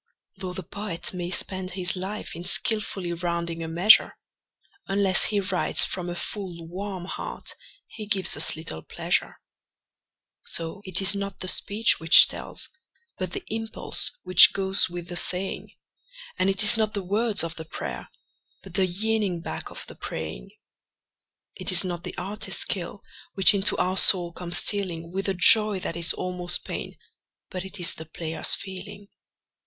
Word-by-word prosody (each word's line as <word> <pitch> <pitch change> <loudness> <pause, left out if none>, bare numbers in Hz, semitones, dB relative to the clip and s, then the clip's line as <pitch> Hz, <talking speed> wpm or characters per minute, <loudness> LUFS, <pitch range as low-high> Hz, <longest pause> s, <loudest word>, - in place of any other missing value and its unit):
Though 185 -1 -7
the 190 0 -5
poet 200 -1 -3
may 175 -1 -6
spend 185 0 -3
his 180 -1 +2
life 190 +1 -7
in 170 - -9
skilfully 195 -2 0
rounding 170 -1 -4
a 165 - -6
measure, 175 +7 +4 0.7
Unless 195 -1 +3
he 210 -1 -1
writes 185 -2 +3
from 180 -2 -5
a 175 - -6
full, 175 -3 -7
warm 185 +1 -7
heart - - -8 0.3
he 215 -2 -10
gives 195 -2 +2
us - - +2
little 155 - -7
pleasure. - - -3 1.0
So 165 +4 -2
it 190 0 -1
is 190 - +6
not 200 -1 -6
the 185 - -6
speech 210 +4 +2
which 165 0 +7
tells, - - -5 0.5
but - - -5
the 395 - -6
impulse 225 0 0
which 185 - +7
goes 195 -1 +3
with 175 -1 -9
the 175 - -7
saying; 185 +2 -1 0.7
And 185 +1 +1
it 195 +2 +1
is 215 +2 +8
not 215 -1 -2
the 200 - -4
words 205 0 0
of 165 0 -6
the 160 - -9
prayer, - - -8 0.5
but - - -13
the 190 -2 +1
yearning 200 -1 -1
back - - -7
of - - -10
the - - -11
praying. 80 -7 -8 1.0
It - - +1
is 180 0 +6
not 175 -2 -6
the - - -9
artist's 210 +4 -4
skill 190 +1 -2 0.3
which 195 0 +5
into 200 0 +2
our 185 +1 -1
soul 175 -3 +7
comes 175 0 -1
stealing 175 -5 -1
With 195 +2 -3
a 195 - -2
joy 210 +3 +4
that 165 - -4
is 170 0 +5
almost 180 -1 -3
pain, - - -7 0.5
but 185 -2 -6
it 190 +1 -8
is 175 0 +1
the 160 - -10
player's 160 0 +2
feeling. 200 +1 -10
185 Hz, 165 wpm, -24 LUFS, 175-200 Hz, 1.0 s, is